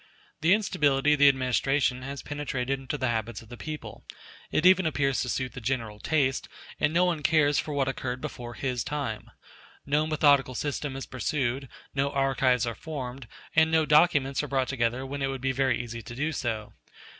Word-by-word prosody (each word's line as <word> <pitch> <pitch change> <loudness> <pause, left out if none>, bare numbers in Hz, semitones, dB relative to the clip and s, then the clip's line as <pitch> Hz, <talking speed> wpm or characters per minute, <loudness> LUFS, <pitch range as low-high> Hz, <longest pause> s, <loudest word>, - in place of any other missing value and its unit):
The 165 +5 +5
instability 150 -9 +2
of 150 - 0
the 145 0 +8
administration 130 0 +1
has 140 +2 -6
penetrated 135 -3 -2
into 135 +2 -4
the 130 -3 0
habits 115 -1 -3
of 110 - -18
the 120 - -8
people: 155 +4 -7 0.5
it 160 - 0
even 185 -1 +6
appears 135 -3 +1
to 125 - -3
suit 130 +1 -2
the 125 - -8
general 115 -3 -2
taste, 135 0 0 0.3
and 145 - +2
no 175 +3 +3
one 170 -4 0
cares 145 -1 +3
for 150 - -3
what 135 -2 +1
occurred 130 -1 -3
before 120 -1 -7
his 125 -3 -2
time. 140 -7 -4 0.6
No 150 +2 +1
methodical 145 -4 +3
system 145 0 -3
is 135 - -5
pursued; 130 0 -2 0.2
no 140 0 0
archives 135 -3 +2
are 115 - -2
formed; 130 -3 -6 0.3
and 160 0 +5
no 160 -1 +3
documents 150 -3 +4
are 150 - -4
brought 135 -1 0
together 125 0 -1
when 140 +1 -5
it 135 - +1
would 135 -1 -3
be 135 0 +1
very 130 -2 +1
easy 120 -1 -6
to 120 +2 -9
do 150 +5 -1
so. 115 -7 -3
135 Hz, 190 wpm, -27 LUFS, 125-150 Hz, 0.6 s, the